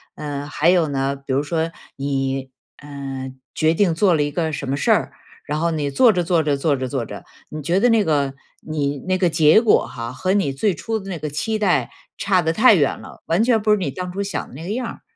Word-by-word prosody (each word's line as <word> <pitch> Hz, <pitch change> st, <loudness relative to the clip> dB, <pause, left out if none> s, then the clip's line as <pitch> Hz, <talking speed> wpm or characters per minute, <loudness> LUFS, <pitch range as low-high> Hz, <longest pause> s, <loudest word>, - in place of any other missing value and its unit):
呃， 145 Hz, -1 st, -5 dB
还 155 Hz, +3 st, +1 dB
有 175 Hz, -4 st, +4 dB
呢， 135 Hz, 0 st, -1 dB
比 140 Hz, -1 st, -5 dB
如 140 Hz, +2 st, +1 dB
说 165 Hz, +2 st, -1 dB, 0.3 s
你 135 Hz, -1 st, -2 dB, 0.3 s
呃 135 Hz, -2 st, -7 dB, 0.2 s
决 160 Hz, 0 st, +2 dB
定 175 Hz, -1 st, +2 dB
做 185 Hz, 0 st, +3 dB
了 150 Hz, -, +2 dB
一 145 Hz, -, -2 dB
个 160 Hz, 0 st, -1 dB
什 140 Hz, -2 st, -4 dB
么 140 Hz, -, 0 dB
事 145 Hz, -, +1 dB
儿， -, -, +2 dB, 0.3 s
然 150 Hz, +1 st, -2 dB
后 170 Hz, 0 st, +1 dB
你 150 Hz, -3 st, -1 dB
做 225 Hz, -, +5 dB
着 175 Hz, -1 st, 0 dB
做 170 Hz, -1 st, +2 dB
着 145 Hz, -1 st, +1 dB
做 145 Hz, 0 st, +1 dB
着 130 Hz, 0 st, -3 dB
做 125 Hz, -3 st, -3 dB
着， 100 Hz, -, -9 dB, 0.2 s
你 155 Hz, 0 st, -6 dB
觉 175 Hz, +5 st, +1 dB
得 245 Hz, -, +4 dB
那 225 Hz, -2 st, +4 dB
个 140 Hz, -4 st, 0 dB, 0.3 s
你 145 Hz, -2 st, -2 dB
那 185 Hz, -, +2 dB
个 180 Hz, -2 st, +2 dB
结 160 Hz, +5 st, +5 dB
果 225 Hz, -, +3 dB
哈， 115 Hz, +1 st, -6 dB
和 185 Hz, +7 st, -1 dB
你 190 Hz, -10 st, +1 dB
最 195 Hz, +8 st, +1 dB
初 225 Hz, +7 st, -3 dB
的 195 Hz, 0 st, -9 dB
那 170 Hz, -4 st, -4 dB
个 150 Hz, -, -4 dB
期 215 Hz, +9 st, -2 dB
待 165 Hz, -, +1 dB, 0.3 s
差 190 Hz, -2 st, +2 dB
得 160 Hz, 0 st, 0 dB
太 220 Hz, +2 st, +6 dB
远 145 Hz, -5 st, +1 dB
了， -, -, -13 dB
完 175 Hz, +7 st, +2 dB
全 230 Hz, -3 st, +3 dB
不 215 Hz, 0 st, +2 dB
是 -, -, +6 dB
你 155 Hz, -8 st, -2 dB
当 180 Hz, +5 st, -5 dB
初 200 Hz, +2 st, -3 dB
想 195 Hz, -, -4 dB
的 -, -, -15 dB
那 160 Hz, -, -8 dB
个 180 Hz, -, -6 dB
样 245 Hz, +1 st, -2 dB
儿， -, -, -9 dB
155 Hz, 270 characters per minute, -21 LUFS, 140-185 Hz, 0.3 s, 太